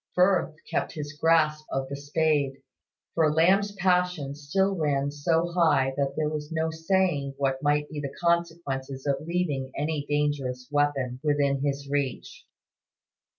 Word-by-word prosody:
Firth 180 -3 +3
kept - - -2
his 150 -2 -6
grasp 155 -1 +2
of 135 0 -1
the 140 - -5
spade; 145 -1 +1 0.6
for 160 -2 +3
Lamb's 190 +6 +3
passion 180 -6 +1
still 190 +7 0
ran 145 -4 0
so 165 +4 0
high 145 -6 +3
that 140 0 -1
there 155 -1 +1
was 150 0 -4
no 160 0 0
saying 160 -4 0
what 135 -1 0
might 150 0 +1
be 150 -1 -6
the 140 -2 -4
consequences 160 -6 -1
of 140 -1 +1
leaving 155 -5 -2
any 150 0 -1
dangerous 140 -4 -1
weapon 140 -4 0
within 145 -2 +1
his 140 -1 -2
reach. 145 - -3
150 Hz, 145 wpm, -27 LUFS, 140-165 Hz, 0.6 s, Firth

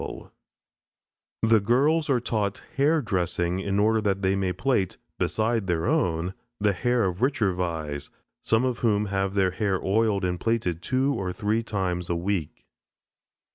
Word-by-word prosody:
The 115 -1 +5
girls 145 +9 +2
are 130 -3 +3
taught 105 -4 -2
hair 150 +2 +3
dressing 90 -3 -1
in 100 0 -1
order 110 +2 +3
that 100 -2 -1
they 95 +1 +2
may 95 -1 0
plait, 95 0 0 0.2
beside 110 -2 0
their 85 -2 0
own, 85 +1 0 0.3
the 105 -1 +2
hair 120 +5 +1
of 90 -1 -2
the - - -2
richer 110 -8 +1
Vais, 80 -5 -3 0.3
some 115 +3 +2
of 125 -2 -1
whom 105 -3 +2
have 95 0 -1
their 95 -2 +3
hair 95 0 0
oiled 105 -1 +2
and 90 -1 -1
plaited 100 -7 -1
two 130 +5 +1
or 95 -6 -2
three 105 +4 0
times 95 -5 -2
a 85 - +1
week. 85 -3 -3
100 Hz, 160 wpm, -26 LUFS, 90-115 Hz, 0.3 s, The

